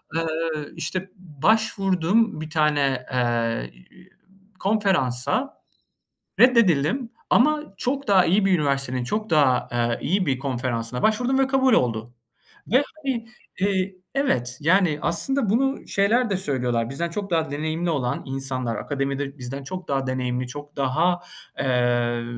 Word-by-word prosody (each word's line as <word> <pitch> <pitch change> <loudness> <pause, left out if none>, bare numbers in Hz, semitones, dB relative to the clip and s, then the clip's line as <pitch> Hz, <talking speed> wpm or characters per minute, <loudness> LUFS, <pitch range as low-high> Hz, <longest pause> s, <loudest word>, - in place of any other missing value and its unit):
Iıı, 160 -2 -2
işte, 185 +4 -3
başvurdum 195 +2 +1
bir 155 - -6
tane, 145 -5 +1
ııı, 115 - 0 0.9
konferansa, 195 - 0 0.8
reddedildim 230 - +4 0.2
ama 300 -2 +2
çok 275 +2 -2
daha 190 -3 +5
iyi 195 +3 +3
bir 195 - +3
üniversitenin, 135 -3 0
çok 210 - -3
daha, 140 -6 +3
ııı, 120 -1 0
iyi 185 +3 +1
bir 135 -4 0
konferansına 125 -3 -3
başvurdum 245 +5 +2
ve 270 - +3
kabul 265 -2 +3
oldu 115 - +1 0.5
ve, 255 +6 +4
hani, 265 -7 -3 0.3
ııı, 195 -1 +1 0.2
evet, 125 - 0
yani, 165 -2 +3
aslında 225 +7 0
bunu 270 +5 0
şeyler 225 +5 +2
de 195 - 0
söylüyorlar, 125 -9 -1
bizden 170 +6 -3
çok 200 +2 -5
daha 160 -3 0
deneyimli 160 +4 -2
olan 130 -6 -1
insanlar, 130 -3 -3
akademide 140 +2 -3
bizden 130 +2 -6
çok 180 +6 -7
daha 135 -1 0
deneyimli, 125 -1 -2
çok 145 +3 -9
daha, 160 +6 +1 0.4
ııı, 120 -2 +1
155 Hz, 130 wpm, -24 LUFS, 130-200 Hz, 0.9 s, daha